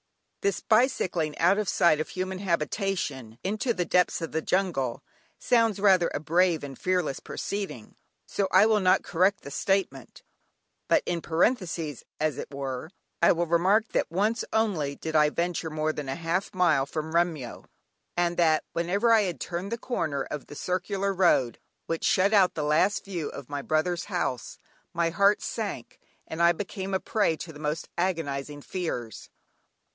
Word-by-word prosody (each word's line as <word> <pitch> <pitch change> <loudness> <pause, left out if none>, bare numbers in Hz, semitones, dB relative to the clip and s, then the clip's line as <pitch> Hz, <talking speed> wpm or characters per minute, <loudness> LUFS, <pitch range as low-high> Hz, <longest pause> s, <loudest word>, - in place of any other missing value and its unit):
This 200 -2 0
bicycling 185 - +1
out 180 +5 +3
of 210 - -1
sight 155 -3 +4
of 155 - -3
human 185 0 -4
habitation, 170 - -2
into 215 +6 -1
the 180 -6 -1
depths 180 +1 +2
of 165 - -5
the 160 - -1
jungle, 160 -11 -1 0.3
sounds 230 -4 +2
rather 190 -4 +4
a - - -2
brave 165 +1 +2
and 135 -1 -7
fearless 180 -3 -1
proceeding, 195 - -5 0.3
so 200 - -1
I 190 +2 +6
will 220 -1 +3
not 185 -1 +3
correct 190 +4 +1
the 140 - -9
statement, 160 - -2 0.6
but - - +3
in 170 -1 -2
parenthesis, 165 - 0 0.2
as 155 -3 0
it - - -7
were, 135 +1 -5 0.3
I 170 - +6
will 175 0 +1
remark 190 +7 +2
that - - 0
once 210 +7 0
only 180 -11 0
did 160 +2 -5
I 150 -1 +5
venture 170 +1 -2
more 155 0 -1
than 150 -3 -5
half 165 +7 -2
a 195 - -14
mile 155 -7 +3
from 155 +2 -4
Remyo, 165 -7 -1 0.5
and 175 0 +1
that 160 -2 +3
whenever 200 +7 +2
I 220 - +6
had 180 -9 -2
turned 180 - -4
the 235 - -1
corner 155 - -2
of 150 0 -7
the 145 - -10
circular 195 +4 -1
road, 170 -10 +2 0.3
which 165 0 -3
shut 195 +3 +3
out 195 -3 +4
the 155 - -2
last 155 +7 +2
view 175 -6 -4
of 140 -2 -9
my 145 -1 -3
brother's 170 +4 0
house, 175 - -3 0.4
my 170 -1 +1
heart 200 +4 +3
sank, 205 - -5 0.3
and 160 +1 -5
I 170 0 +6
became 190 +1 -4
a - - +1
prey 200 -8 0
to 165 0 -8
the 145 - -12
most 150 +1 -3
agonising 145 -5 -2
fears. 125 - -5
170 Hz, 170 wpm, -27 LUFS, 155-195 Hz, 0.6 s, I